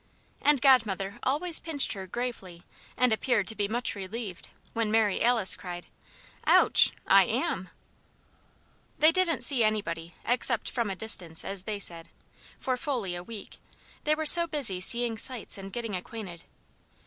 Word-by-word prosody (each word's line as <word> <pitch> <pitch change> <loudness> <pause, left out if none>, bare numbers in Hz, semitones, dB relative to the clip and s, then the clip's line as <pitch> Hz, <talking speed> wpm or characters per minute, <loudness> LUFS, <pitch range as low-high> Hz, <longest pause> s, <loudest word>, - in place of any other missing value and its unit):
And 295 -2 +2
Godmother 220 -5 +2
always 320 +6 0
pinched 310 -5 -1
her, 190 -2 -8
gravely, 190 -7 -6 0.3
and 250 -3 +2
appeared 220 -2 0
to 220 - +1
be 205 -2 -1
much 235 +3 -2
relieved 200 -1 -8 0.2
when 230 -2 -2
Mary 215 -2 +1
Alice 230 -5 +3
cried 175 -1 -9 0.6
"Ouch! - - +5
I - - +5
am!" - - -3 1.3
They 310 +1 +5
didn't 345 -2 0
see 260 -5 +3
anybody, 170 -6 -3
except 240 -1 0
"from 235 -4 -2
a 195 - -4
distance" 180 -6 -2
as 195 -1 -1
they 215 -1 -4
said, 170 -4 -4 0.5
for 255 -1 -3
fully 245 - -3
a 175 - -6
week; 210 +3 -11 0.4
they 305 +1 +1
were 315 0 -4
so 340 +2 +9
busy 255 - -1
seeing 235 +2 +4
sights 255 -4 -1
and 195 0 -9
getting 230 -3 -5
acquainted. 185 -2 -9
220 Hz, 150 wpm, -27 LUFS, 190-250 Hz, 1.3 s, so